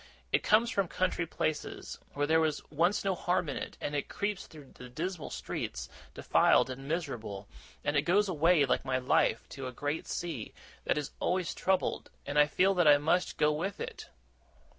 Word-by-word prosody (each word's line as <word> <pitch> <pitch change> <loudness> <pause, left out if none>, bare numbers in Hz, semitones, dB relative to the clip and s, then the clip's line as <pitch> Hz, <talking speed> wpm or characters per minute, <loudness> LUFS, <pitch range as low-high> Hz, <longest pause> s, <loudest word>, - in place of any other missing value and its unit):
It - - +3
comes 230 +3 +3
from 195 -5 +1
country 180 -1 -1
places, 155 -1 -3 0.2
where 145 0 +1
there 160 +2 +4
was 155 -2 -1
once 170 +7 +2
no 195 - +2
harm 180 -1 0
in 140 - -3
it - - -6
and 145 - -3
it 145 - -2
creeps 205 -1 -3
through 150 -4 -14
the 125 - -11
dismal 165 +5 -4
streets, - - -5 0.3
defiled 130 - +4
and 135 +2 -8
miserable 120 - -4 0.4
and 145 - 0
it 145 - +4
goes 200 +6 +3
away, 165 -3 +4
like 130 - +1
my 130 -1 0
life, 125 -3 +2
to 135 -1 -6
a - - -5
great 145 +5 -3
sea, 160 -11 -4 0.3
that - - +1
is 150 - -3
always 180 -1 0
troubled 190 -1 0 0.2
and 145 +1 +1
I 150 - +6
feel 185 +6 +3
that 175 -4 +3
I 145 -1 +8
must 160 +5 +1
go 150 - +4
with 180 +6 -3
it! - - -6
155 Hz, 190 wpm, -31 LUFS, 145-180 Hz, 0.4 s, I